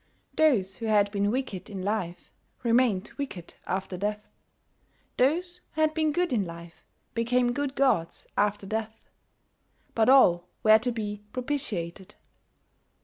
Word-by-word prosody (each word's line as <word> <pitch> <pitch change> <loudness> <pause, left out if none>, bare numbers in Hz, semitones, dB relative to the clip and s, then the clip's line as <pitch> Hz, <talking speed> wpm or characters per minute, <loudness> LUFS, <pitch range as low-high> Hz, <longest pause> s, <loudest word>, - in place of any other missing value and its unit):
Those 205 - +2
who 225 - -4
had 205 -2 +3
been 200 0 +1
wicked 215 -6 -3
in 195 -3 -6
life 190 -4 -3 0.3
remained 230 -4 +2
wicked 190 -12 -6
after 190 0 -3
death; 210 +2 -3 0.9
those 350 +7 +1
who 315 - 0
had 310 0 +3
been 315 -1 +1
good 350 -1 0
in 215 -4 +2
life 170 -1 -10 0.3
became 240 +1 +1
good 280 0 -2
gods 255 -12 +1
after 205 0 +1
death; 220 +2 -5 0.8
but 225 +1 +3
all 180 -10 +6 0.2
were 215 0 +7
to 245 +2 -1
be 210 -3 -4
propitiated. 215 - -4
220 Hz, 135 wpm, -27 LUFS, 195-260 Hz, 0.9 s, were